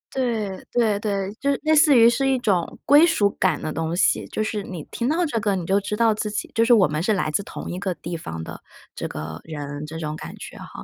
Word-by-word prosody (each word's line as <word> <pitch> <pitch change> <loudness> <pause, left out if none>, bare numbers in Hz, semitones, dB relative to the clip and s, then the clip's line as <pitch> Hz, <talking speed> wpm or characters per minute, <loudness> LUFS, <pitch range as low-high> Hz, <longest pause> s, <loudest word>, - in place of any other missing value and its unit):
对， 225 -7 -2
对， 220 -4 +2
对， 200 -2 -2
就 280 - +1
是 275 - -1
类 315 0 +3
似 295 -3 +6
于 230 - +8
是 270 +3 +2
一 265 - +2
种 190 -8 0
归 295 +3 +7
属 210 -12 +2
感 185 - +2
的 155 - -4
东 165 +1 -2
西， - - +2
就 215 - -2
是 215 -1 -2
你 180 -5 -7
听 240 +3 -1
到 340 +3 +1
这 265 -8 -1
个 205 -2 0
你 180 - -3
就 195 +3 +2
知 210 +1 -4
道 230 -1 +4
自 210 0 -3
己 210 - -4
就 230 - +3
是 235 - +2
我 210 -8 +6
们 150 +1 -2
是 215 +5 +2
来 180 -6 -1
自 200 - 0
同 - - -7
一 180 - -4
个 190 -3 -2
地 170 +1 -6
方 80 - -6
的 - - -9 0.3
这 - - -4
个 75 +1 -7
人， 145 -2 -6
这 160 +1 -7
种 155 -1 -4
感 - - -8
觉 - - -9
哈。 - - -10
200 Hz, 285 characters per minute, -23 LUFS, 165-235 Hz, 0.3 s, 于